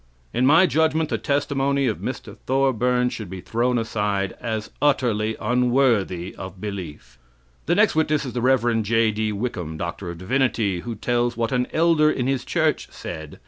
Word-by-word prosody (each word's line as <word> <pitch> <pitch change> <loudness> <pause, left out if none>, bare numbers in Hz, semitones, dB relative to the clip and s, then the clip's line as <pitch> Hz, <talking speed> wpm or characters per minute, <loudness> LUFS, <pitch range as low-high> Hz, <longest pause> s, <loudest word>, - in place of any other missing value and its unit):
In 125 +2 +2
my 160 +6 +6
judgment, 160 0 +1
the - - -1
testimony 140 -1 0
of 110 -4 -1
Mr. - - -6
Thorburn 125 -2 +2
should 110 -6 -7
be 95 0 -6
thrown 120 +6 0
aside 105 -4 -1
as 110 -2 -3
utterly 120 -7 +1
unworthy 120 -7 +1
of 95 0 -8
belief. 80 -11 -7 0.5
The 175 - +3
next 210 +2 +4
witness 155 -2 +1
is 125 - -5
the 120 - -2
Rev. 120 -3 +2
J.D. 110 0 +1
Wickham, 95 -8 -4
D.D., 95 - -1
who 115 +5 -5
tells 120 +2 0
what 115 -1 -1
an 125 -1 +1
elder 160 -2 +4
in 130 -5 -1
his 135 -1 0
church - - 0
said. 80 -3 -8
120 Hz, 155 wpm, -23 LUFS, 105-135 Hz, 0.5 s, my